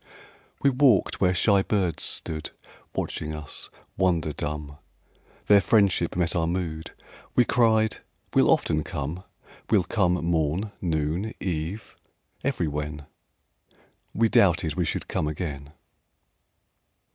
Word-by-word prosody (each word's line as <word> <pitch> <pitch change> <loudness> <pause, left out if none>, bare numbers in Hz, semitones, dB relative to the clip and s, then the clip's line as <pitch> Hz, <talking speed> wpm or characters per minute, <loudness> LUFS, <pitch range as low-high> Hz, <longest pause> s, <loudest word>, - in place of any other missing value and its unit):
We 140 - +5
walked 130 -6 +3
where 90 -1 +3
shy 100 +2 +4
birds 95 -5 0
stood 80 -1 -2 0.5
Watching 75 0 -3
us, 75 -1 -4 0.3
wonder 85 -5 +1
dumb; 75 0 -5 0.7
Their 100 -1 +6
friendship 100 -5 +2
met 85 -1 0
our 80 -1 +1
mood; 85 -2 -3 0.5
We 125 - +5
cried: 110 -2 +3 0.4
"We'll - - +4
often 75 0 +2
come: 80 +4 -5 0.5
We'll 100 -4 +4
come 95 -2 +1
morn, 85 +4 0
noon, 85 +5 -1
eve, 90 +3 -4 0.5
everywhen!" 75 - -2 1.1
—We 115 +1 +4
doubted 85 -7 +3
we 90 0 0
should - - -3
come 75 - -1
again. 75 -3 -5
85 Hz, 110 wpm, -26 LUFS, 75-100 Hz, 1.1 s, Their